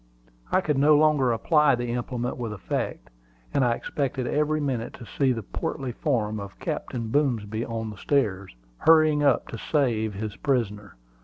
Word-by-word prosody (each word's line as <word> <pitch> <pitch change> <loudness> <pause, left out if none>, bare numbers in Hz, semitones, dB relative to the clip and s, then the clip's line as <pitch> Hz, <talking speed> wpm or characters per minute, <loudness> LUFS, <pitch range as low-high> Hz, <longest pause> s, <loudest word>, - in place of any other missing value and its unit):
I - - +4
could 150 -6 0
no 150 +1 +6
longer 150 -5 +3
apply 150 +4 +3
the 120 -1 -3
implement 125 0 -3
with 115 -4 -4
effect, 95 -10 -4 0.4
and 135 - +3
I 120 -1 +3
expected 135 -2 -3
every 150 +3 +1
minute 130 -6 -2
to 120 - -10
see 130 +6 +1
the 115 -3 -2
portly 135 - -4
form 110 -5 -1
of 100 -1 -8
Captain 115 -2 -4
Boomsby 115 -6 0
on 110 -1 -4
the 105 - -11
stairs, 100 - 0 0.2
hurrying 155 -2 +5
up 140 -4 +3
to 115 - -6
save 115 -8 0
his 105 +1 -4
prisoner. 105 - -1
125 Hz, 165 wpm, -26 LUFS, 110-145 Hz, 0.4 s, no